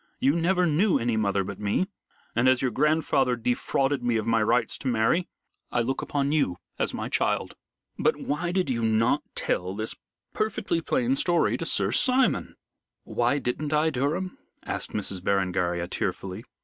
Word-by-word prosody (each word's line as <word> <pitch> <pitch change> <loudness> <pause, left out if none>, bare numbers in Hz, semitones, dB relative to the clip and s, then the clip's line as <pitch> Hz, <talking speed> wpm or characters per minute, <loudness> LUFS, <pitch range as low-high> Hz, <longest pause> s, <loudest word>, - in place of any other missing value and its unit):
"You 140 +3 +2
never 180 +2 +2
knew 175 +4 +3
any 120 -2 0
mother 100 -2 +1
but 100 +1 -7
me, 105 - +1 0.5
and 120 +2 +4
as 130 -1 +4
your 130 -1 0
grandfather 140 -2 +2
defrauded 130 +3 0
me 120 -2 +1
of 110 - -2
my 115 -1 +2
rights 115 +1 +2
to - - -5
marry, 125 +9 +2 0.4
I 120 - +1
look 130 +3 -1
upon 140 -1 -1
you 140 - +1 0.2
as - - +1
my - - -4
child." - - 0 0.4
"But - - +3
why 175 +4 -2
did 185 -2 0
you 115 -2 -1
not 115 +6 +2
tell 90 +2 -1
this 110 +1 -4 0.4
perfectly 215 -5 -1
plain 130 -4 +1
story 170 +4 +2
to - - -4
Sir - - +1
Simon?" 255 0 +3 0.5
"Why 140 - +1
didn't 145 +3 -2
I, 155 +1 +3
Durham?" 155 +8 -2 0.3
asked - - -3
Miss 100 -2 -1
Berengaria 90 -2 0
tearfully. 95 +4 -4
125 Hz, 165 wpm, -26 LUFS, 110-155 Hz, 0.5 s, and